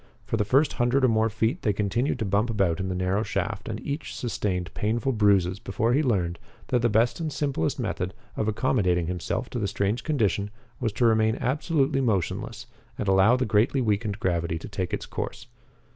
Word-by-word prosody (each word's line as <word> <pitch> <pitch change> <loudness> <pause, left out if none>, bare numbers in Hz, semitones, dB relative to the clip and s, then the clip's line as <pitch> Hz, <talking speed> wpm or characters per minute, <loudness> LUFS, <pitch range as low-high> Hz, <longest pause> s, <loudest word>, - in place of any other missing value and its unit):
For - - -1
the 110 - +1
first 135 +8 +3
hundred 125 +2 +2
or - - +4
more 110 0 +2
feet 110 +2 -1
they 105 - +1
continued 110 +8 0
to 110 - -2
bump 100 +4 +1
about 95 -6 +1
in 95 0 -2
the 90 - -2
narrow 90 +3 0
shaft 110 -1 -3
and 110 -1 -3
each 145 +2 -4
sustained 90 -7 -2
painful 115 +6 0
bruises 100 -5 +3
before 115 +2 0
he 145 - +3
learned 90 - 0 0.3
that 125 -2 +2
the 120 - +3
best 115 +6 +2
and 160 -2 -2
simplest 140 - -1
method 90 +2 -3 0.2
of 110 - -1
accommodating 100 -6 +1
himself 90 0 -3
to 120 - -2
the 105 - 0
strange 100 +4 -1
condition 105 - 0 0.3
was 115 -3 0
to 120 - +1
remain 110 -1 +3
absolutely 135 +1 +1
motionless 105 -9 -1 0.3
and 105 - -3
allow 95 +5 +5
the 130 0 0
greatly 110 +6 +2
weakened 105 -3 0
gravity 85 -4 0
to 80 - -8
take 95 -3 -3
its - - -3
course. - - -5
110 Hz, 195 wpm, -26 LUFS, 95-120 Hz, 0.3 s, allow